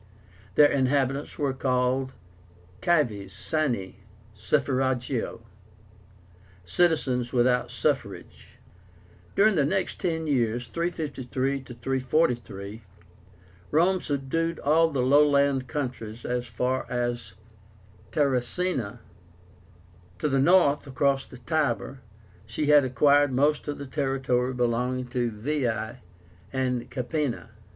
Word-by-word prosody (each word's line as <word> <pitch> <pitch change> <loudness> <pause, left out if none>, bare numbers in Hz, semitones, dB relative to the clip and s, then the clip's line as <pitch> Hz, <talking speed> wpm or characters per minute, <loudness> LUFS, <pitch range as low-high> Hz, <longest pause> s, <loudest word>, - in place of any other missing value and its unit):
Their 145 - +6
inhabitants 135 +1 0
were 140 -3 0
called 130 0 0 0.7
CIVES 120 - +1
SINE 115 -4 -2 0.4
SUFFRAGIO, 130 +1 -1 1.2
"citizens 130 - +1
without 125 -1 +2
suffrage." 125 -4 -3 0.8
During 215 +2 +5
the 155 -6 +2
next 190 +7 -1
ten 160 -3 -1
years 120 -4 0
(353 140 -5 -2
343) 120 -4 -2 0.9
Rome 180 +4 +3
subdued 155 +4 -2
all 160 +3 +4
the 135 -5 -1
lowland 140 -1 +4
countries 120 -5 -5
as 125 0 -2
far 125 +3 -1
south - - -15
as 120 -5 -2 0.8
TARRACÍNA. 130 - 0 1.2
To 90 - -1
the 135 -2 +1
north, 150 -2 +4
across 135 0 0
the 125 - -12
Tiber, 135 - -1 0.5
she 115 +7 -2
had 145 -1 +6
acquired 140 +3 +3
most 145 +4 +1
of 145 - -3
the 140 - -7
territory 130 -2 -1
belonging 125 +1 0
to 120 -1 0
VEII 120 0 -2 0.5
and 125 -2 -1
CAPÉNA. 125 -1 -3
130 Hz, 100 wpm, -26 LUFS, 120-145 Hz, 1.2 s, Their